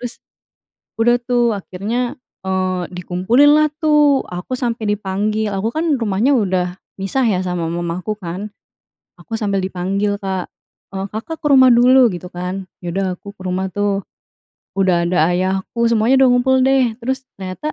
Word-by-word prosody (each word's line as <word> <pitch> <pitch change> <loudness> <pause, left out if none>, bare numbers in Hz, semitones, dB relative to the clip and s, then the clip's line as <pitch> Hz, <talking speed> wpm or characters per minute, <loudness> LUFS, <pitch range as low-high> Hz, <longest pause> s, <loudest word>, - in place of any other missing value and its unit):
Terus, 245 -1 -6 0.9
udah 240 +1 +4
tuh, 240 -2 +1
akhirnya, 220 +7 -3 0.3
eee, 185 -1 -1
dikumpulin 185 +11 +3
lah, 305 - +4 0.2
tuh. 295 -3 +4
Aku 180 +8 -6
sampai 235 -3 -2
dipanggil. 210 +2 -1
Aku 200 +3 -2
kan 315 -2 +1
rumahnya 230 +4 +1
udah 185 -3 0 0.3
misah 255 +7 0
ya, 200 -5 +2
sama 180 -2 -2
mamaku, 175 +4 -3
kan. 190 +3 -6 0.7
Aku 225 - -5
sambil 200 -3 0
dipanggil, 195 +2 -1
Kak. 190 -2 -4 0.4
“Eee, 195 0 -4
Kakak 320 +9 -5
ke 300 - -5
rumah 260 -1 +7
dulu," 245 +1 +6
gitu 180 -1 -7
kan. 185 +2 -4 0.2
Ya 175 - -4
udah, 195 +2 -1
aku 200 - -11
ke 190 -2 -14
rumah, 185 +1 -2
tuh. 200 0 -1 0.7
Udah 175 -3 +2
ada 175 -2 +2
ayahku, 190 +6 0
semuanya 235 +4 +3
udah 265 - +6
ngumpul, 260 +1 +3
deh. 260 -2 +3
Terus, 265 +2 -3 0.2
ternyata. 190 +11 -4
205 Hz, 155 wpm, -18 LUFS, 185-245 Hz, 0.9 s, rumah